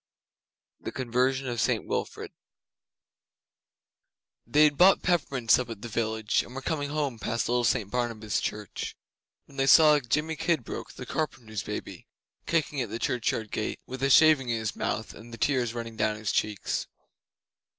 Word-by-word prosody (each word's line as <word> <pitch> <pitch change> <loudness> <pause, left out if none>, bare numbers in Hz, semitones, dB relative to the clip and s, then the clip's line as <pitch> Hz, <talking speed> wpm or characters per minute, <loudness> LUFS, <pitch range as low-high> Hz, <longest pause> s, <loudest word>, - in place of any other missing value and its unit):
The - - -6
Conversion 130 +2 0
of 120 -3 -1
St - - +1
Wilfrid - - -4 2.2
They 150 +6 +5
had 150 -1 +4
bought 185 +5 +5
peppermints 140 -10 +2
up 125 -2 -4
at 110 -3 -8
the - - -4
village, 110 -1 0
and 125 - -11
were 135 - -6
coming 145 -2 -2
home 145 -6 -2
past 115 +1 -1
little 120 +1 +1
St 110 -4 +1
Barnabas' 115 -4 -1
Church, 105 -2 -5 0.5
when 140 - -17
they 135 0 +1
saw 150 +1 +7
Jimmy 150 +5 -1
Kidbrooke, 165 -5 -2
the - - -8
carpenter's 115 -9 -3
baby, - - -7 0.4
kicking 150 -4 0
at 120 - -3
the 110 - -4
churchyard 115 -2 -1
gate, 110 - -3
with 130 0 -7
a 135 - +2
shaving 145 -2 +6
in 115 - +1
his 110 -2 -3
mouth - - -3
and 115 +1 -13
the 115 - -8
tears 120 0 0
running 115 -1 -6
down 105 0 +1
his 110 -1 -2
cheeks. 105 -2 -1
125 Hz, 160 wpm, -28 LUFS, 110-145 Hz, 2.2 s, saw